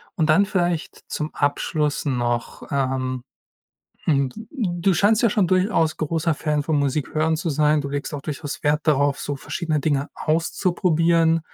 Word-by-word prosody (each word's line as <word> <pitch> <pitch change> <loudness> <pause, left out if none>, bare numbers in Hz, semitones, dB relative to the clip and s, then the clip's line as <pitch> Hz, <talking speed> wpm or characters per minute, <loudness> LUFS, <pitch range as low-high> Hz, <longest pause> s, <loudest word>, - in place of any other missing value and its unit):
und 160 -2 +1
dann 180 +6 +5
vielleicht 175 -5 -2
zum 150 +1 -4
Abschluss 150 +1 0
noch. 120 -3 -2
Ähm, 130 -2 -1 0.8
hm, 140 -3 +2
d 220 - -10
du 190 - 0
scheinst 210 +6 +3
ja 230 - +4
schon 205 -4 +2
durchaus 185 -3 +2
großer 160 +1 0
Fan 150 -1 -1
von 155 +1 0
Musikhören 155 +3 0
zu 170 +1 -3
sein. 150 +1 +3
Du 140 - -4
legst 145 +2 -4
auch 145 - -4
durchaus 145 -1 -5
Wert 150 +1 +2
darauf, 145 -1 +3
so 145 - -3
verschiedene 155 +1 -2
Dinge 140 -1 0
auszuprobieren. 165 0 +2
155 Hz, 155 wpm, -23 LUFS, 145-170 Hz, 0.8 s, dann